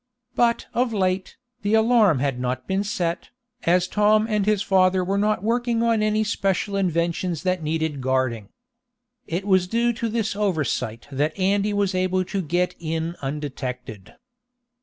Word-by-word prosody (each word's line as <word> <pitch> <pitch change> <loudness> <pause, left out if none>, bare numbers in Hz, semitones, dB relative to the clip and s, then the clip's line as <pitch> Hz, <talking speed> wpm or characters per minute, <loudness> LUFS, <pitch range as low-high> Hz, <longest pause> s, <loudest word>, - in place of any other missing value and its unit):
But 235 -1 +2
of 245 -1 +1
late, 185 -2 -1 0.2
the 205 +2 +2
alarm 220 - +4
had 135 -1 -1
not 125 +1 -2
been 195 +1 0
set, 175 -4 -2 0.4
as 180 +1 +3
Tom 215 +1 +3
and 210 -2 0
his 210 -2 +2
father 185 -1 +3
were 195 +2 -1
not 210 -2 +1
working 235 +1 +1
on 230 -2 +2
any 215 0 +2
special 200 -1 -1
inventions 170 -2 -1
that 185 -1 0
needed 160 -2 -2
guarding. 130 -5 -1 0.8
It 175 +4 -3
was 185 -3 +3
due 235 +4 +1
to 230 0 -3
this 220 -2 -1
oversight 155 - -1
that 150 +3 -1
Andy 200 +2 +1
was 200 -2 0
able 185 0 0
to 195 +1 -2
get 175 +2 0
in 165 +1 -3
undetected. 130 -7 -6
185 Hz, 155 wpm, -23 LUFS, 160-210 Hz, 0.8 s, alarm